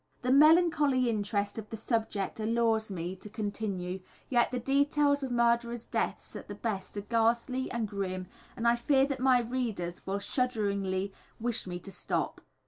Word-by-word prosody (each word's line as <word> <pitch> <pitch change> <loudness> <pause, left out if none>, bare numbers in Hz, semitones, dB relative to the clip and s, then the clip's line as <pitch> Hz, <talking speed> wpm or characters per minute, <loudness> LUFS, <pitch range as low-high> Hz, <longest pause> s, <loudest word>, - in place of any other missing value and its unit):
The 250 - +1
melancholy 295 -4 +5
interest 205 0 -1
of 215 - -9
the 225 - -5
subject 220 -3 -2
allures 225 0 +1
me 180 -1 -4
to 210 - -10
continue, 200 -4 -3 0.3
yet 240 -2 +3
the 250 - -2
details 285 +3 +2
of 270 - -3
murderers' 235 -1 +1
deaths - - -2
at - - -7
the - - -6
best 210 -4 -4
are - - -1
ghastly 235 +4 +1
and 235 -3 -2
grim, 190 -2 -3 0.3
and 235 -1 0
I 235 - +5
fear 270 +3 +3
that 275 -2 -3
my 255 -1 +4
readers 225 -8 -3
will 195 +1 0
shudderingly 200 -4 -1 0.3
wish 235 -3 -1
me 180 -1 -3
to 195 - -9
stop. 170 -3 -2
230 Hz, 165 wpm, -30 LUFS, 200-255 Hz, 0.3 s, melancholy